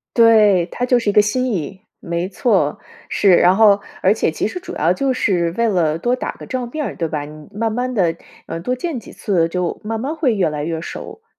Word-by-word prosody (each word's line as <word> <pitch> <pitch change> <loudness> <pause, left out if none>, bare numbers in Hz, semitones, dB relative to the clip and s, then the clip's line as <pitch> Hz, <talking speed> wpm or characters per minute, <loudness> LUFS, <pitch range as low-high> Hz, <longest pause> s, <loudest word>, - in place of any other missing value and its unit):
对， 210 -6 +5
它 245 - -3
就 250 -1 +3
是 225 - -1
一 - - 0
个 210 - +7
心 255 +4 0
意。 190 +2 -4 0.2
没 170 +2 -3
错， 185 - +1 0.3
是。 190 -3 +4
然 180 +2 +5
后 205 -2 +5 0.2
而 190 - +5
且 215 - 0
其 160 - -2
实 290 - -5
主 365 - -8
要 165 +4 +2
就 270 +6 0
是 180 -8 +1
为 235 0 +2
了 165 -6 +1
多 240 +9 0
打 - - -4
个 - - -11
照 255 -2 -3
面 300 +4 -4
儿 - - -5
对 165 - -2
吧， 150 -2 -4
你 150 0 -12
慢 225 +2 -1
慢 250 +2 -2
地， 175 -6 +2 0.3
呃， 165 - -5
多 250 +9 -2
见 280 -1 -4
几 - - -13
次 175 -6 0
就 180 +2 -3
慢 220 +1 -3
慢 280 +6 -3
会 270 -8 +1
越 190 -6 +1
来 150 -1 -4
越 165 0 -3
熟 - - -8
儿。 - - -45
205 Hz, 260 characters per minute, -19 LUFS, 170-240 Hz, 0.3 s, 个